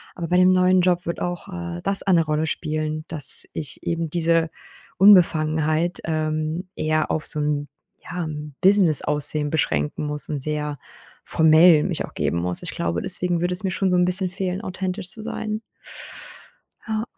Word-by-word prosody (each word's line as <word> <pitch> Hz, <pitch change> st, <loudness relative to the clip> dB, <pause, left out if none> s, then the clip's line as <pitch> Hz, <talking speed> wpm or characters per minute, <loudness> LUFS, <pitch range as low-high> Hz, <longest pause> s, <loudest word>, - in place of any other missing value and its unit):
Aber 170 Hz, -2 st, -5 dB
bei 180 Hz, -, 0 dB
dem 185 Hz, 0 st, +5 dB
neuen 185 Hz, 0 st, +3 dB
Job 180 Hz, -1 st, 0 dB
wird 170 Hz, -, -4 dB
auch, 175 Hz, -1 st, -4 dB
äh, 85 Hz, 0 st, -6 dB
das 195 Hz, 0 st, +3 dB
eine 175 Hz, -4 st, +2 dB
Rolle 155 Hz, +1 st, -1 dB
spielen, 155 Hz, -1 st, -4 dB
dass 150 Hz, -4 st, +4 dB
ich 150 Hz, -, -7 dB
eben 165 Hz, -1 st, -3 dB
diese 165 Hz, 0 st, +1 dB, 0.5 s
Unbefangenheit, 160 Hz, -3 st, +3 dB
ähm, 155 Hz, +2 st, -3 dB
eher 155 Hz, 0 st, -1 dB
auf 155 Hz, -, -2 dB
so 150 Hz, -, -4 dB
'n 145 Hz, -1 st, -2 dB, 0.4 s
ja 175 Hz, 0 st, -5 dB
'n 150 Hz, -2 st, -8 dB
Business-Aussehen 155 Hz, -6 st, +4 dB
beschränken 105 Hz, -, -2 dB
muss 150 Hz, 0 st, -4 dB
und 145 Hz, -2 st, -3 dB
sehr 150 Hz, -1 st, -3 dB, 0.5 s
formell 160 Hz, 0 st, +5 dB
mich -, -, -3 dB
auch -, -, -17 dB
geben 85 Hz, -, -2 dB
muss. 90 Hz, 0 st, -2 dB
Ich -, -, -5 dB
glaube, 85 Hz, +1 st, -3 dB
deswegen 180 Hz, -2 st, -1 dB
würde 180 Hz, +1 st, -1 dB
es 180 Hz, -, -4 dB
mir 190 Hz, -, -1 dB
schon 190 Hz, +1 st, -1 dB
so 180 Hz, -, +1 dB
'n 180 Hz, -, +3 dB
bisschen 185 Hz, 0 st, +1 dB
fehlen, 185 Hz, 0 st, -4 dB
authentisch 185 Hz, 0 st, -5 dB
zu 215 Hz, +1 st, +3 dB
sein. 215 Hz, 0 st, -4 dB, 1.3 s
Ja. 220 Hz, 0 st, -2 dB
165 Hz, 170 wpm, -22 LUFS, 150-180 Hz, 1.3 s, dem